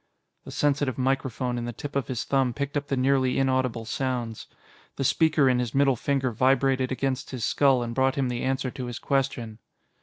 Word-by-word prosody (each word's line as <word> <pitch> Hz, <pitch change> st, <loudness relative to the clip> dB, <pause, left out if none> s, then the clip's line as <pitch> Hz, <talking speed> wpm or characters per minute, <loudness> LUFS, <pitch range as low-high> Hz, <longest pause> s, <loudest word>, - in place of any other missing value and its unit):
The -, -, -8 dB
sensitive 140 Hz, -3 st, 0 dB
microphone 130 Hz, -2 st, -1 dB
in 120 Hz, -, -4 dB
the 120 Hz, -, -3 dB
tip 140 Hz, +5 st, -8 dB
of 140 Hz, -4 st, 0 dB
his 125 Hz, -3 st, -2 dB
thumb 135 Hz, -3 st, +1 dB
picked 140 Hz, 0 st, -3 dB
up 145 Hz, -1 st, -1 dB
the 135 Hz, -, -1 dB
nearly 130 Hz, 0 st, +2 dB
inaudible 130 Hz, -3 st, 0 dB
sounds; 120 Hz, -2 st, -3 dB, 0.5 s
the 135 Hz, -, -2 dB
speaker 155 Hz, 0 st, +3 dB
in 125 Hz, -1 st, +3 dB
his 125 Hz, -1 st, -3 dB
middle 135 Hz, -1 st, +4 dB
finger 135 Hz, +1 st, 0 dB
vibrated 130 Hz, +2 st, +2 dB
against 130 Hz, 0 st, -2 dB
his 125 Hz, -4 st, -3 dB
skull 135 Hz, -4 st, +3 dB
and 120 Hz, 0 st, -4 dB
brought 130 Hz, +1 st, +2 dB
him 135 Hz, -2 st, 0 dB
the 125 Hz, -1 st, -3 dB
answer 130 Hz, -1 st, -1 dB
to 130 Hz, -2 st, -6 dB
his 120 Hz, -, -5 dB
question. 130 Hz, -5 st, -2 dB
130 Hz, 195 wpm, -26 LUFS, 125-135 Hz, 0.5 s, middle